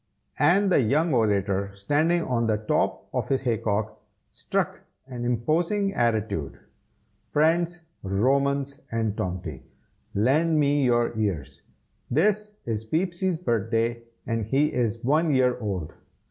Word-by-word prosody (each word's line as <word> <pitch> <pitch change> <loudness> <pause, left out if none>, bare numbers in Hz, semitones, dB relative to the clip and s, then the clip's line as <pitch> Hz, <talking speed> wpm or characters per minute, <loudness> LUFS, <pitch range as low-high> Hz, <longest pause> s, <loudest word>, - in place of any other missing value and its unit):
and 190 +6 +4
the 160 - +5
young 150 +7 +2
orator, 100 -4 +1
standing 155 - +1
on 120 -4 0
the 110 -1 +2
top 105 0 -1
of - - -2
his 135 -1 +1
hay 115 -4 0
cock, 105 0 -2 0.3
struck - - -2 0.2
an 125 -2 -6
imposing 165 - 0
attitude. 110 - -1 0.7
"Friends, 170 +3 +1 0.2
Romans, 140 +8 0
and 110 -2 -1
Tomty, 90 -7 -4 0.5
lend 150 +9 +3
me 145 -1 +3
your 120 -2 +2
ears! 95 -11 -2 0.5
this 210 +9 +1
is 110 -2 -2
Peepsy's 175 - -1
birthday, 115 - 0 0.2
and 115 -2 -1
he 140 +7 +1
is 115 -2 -1
one 150 +3 +2
year 125 -1 +2
old. 95 -8 -4
125 Hz, 125 wpm, -25 LUFS, 110-155 Hz, 0.7 s, the